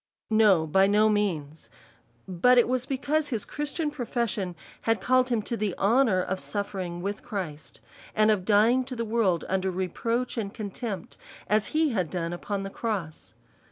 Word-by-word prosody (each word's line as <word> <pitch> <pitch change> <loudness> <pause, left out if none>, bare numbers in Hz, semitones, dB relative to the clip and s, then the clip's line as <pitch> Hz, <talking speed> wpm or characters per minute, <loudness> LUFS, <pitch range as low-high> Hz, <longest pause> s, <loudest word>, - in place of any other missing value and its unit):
No, 210 -7 +5
by 190 +5 +4
no 210 +2 +4
means. 160 -8 -2 0.6
But 190 +8 +4
it 240 - +5
was 255 +1 -1
because 285 +3 0
his 230 -6 -3
Christian 295 +1 -3
profession 235 -8 -2 0.3
had 225 -2 +1
called 255 +5 +2
him 230 -3 0
to 235 - -3
the 210 -5 -2
honour 210 -2 +3
of 190 +1 -3
suffering 190 -4 -4
with 200 +2 -3
Christ, 175 -10 -6 0.3
and 215 0 +4
of 200 -4 +1
dying 225 +6 +4
to 255 0 -6
the 230 -1 -2
world 215 -6 +1
under 190 0 0
reproach 230 +7 -2
and 200 -3 -3
contempt, 205 -3 -6 0.3
as 215 +1 +2
he 315 0 +2
had 185 - -1
done 170 0 -3
upon 195 +3 -3
the 195 - -6
cross. 195 -10 -4
210 Hz, 165 wpm, -27 LUFS, 185-240 Hz, 0.6 s, No